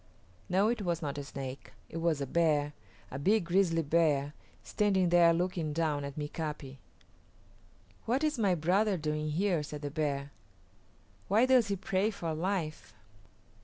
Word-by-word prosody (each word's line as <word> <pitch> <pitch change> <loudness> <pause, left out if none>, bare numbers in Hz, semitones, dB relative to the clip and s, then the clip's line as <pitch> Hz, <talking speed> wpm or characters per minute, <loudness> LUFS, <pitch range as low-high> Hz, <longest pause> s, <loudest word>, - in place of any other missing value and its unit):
No, 190 +3 +3
it 235 -2 -1
was 170 -4 -2
not 145 -1 -3
a - - -5
Snake; 135 -1 -7
it 165 - -7
was 165 -3 0
a - - 0
bear, 150 -1 +1 0.4
a 130 - -5
big 200 +5 +2
grizzly 170 -2 +2
bear, 145 -2 +2 0.3
standing 195 -4 +1
there 170 -1 +6
looking 170 -2 -1
down 150 -3 0
at 140 0 -6
Mika´pi. 150 -2 -5 1.3
"What 255 +6 0
is 305 -5 0
my 195 -4 +3
brother 190 +5 +2
doing 150 -1 -2
here?" 175 +1 +1
said 150 0 -7
the 145 - -3
bear. 145 -2 -2 1.0
"Why 220 +5 +4
does 255 -4 +4
he 200 - 0
pray 195 +1 0
for 170 -6 -4
life?" 165 -1 -3
165 Hz, 155 wpm, -31 LUFS, 150-190 Hz, 1.3 s, there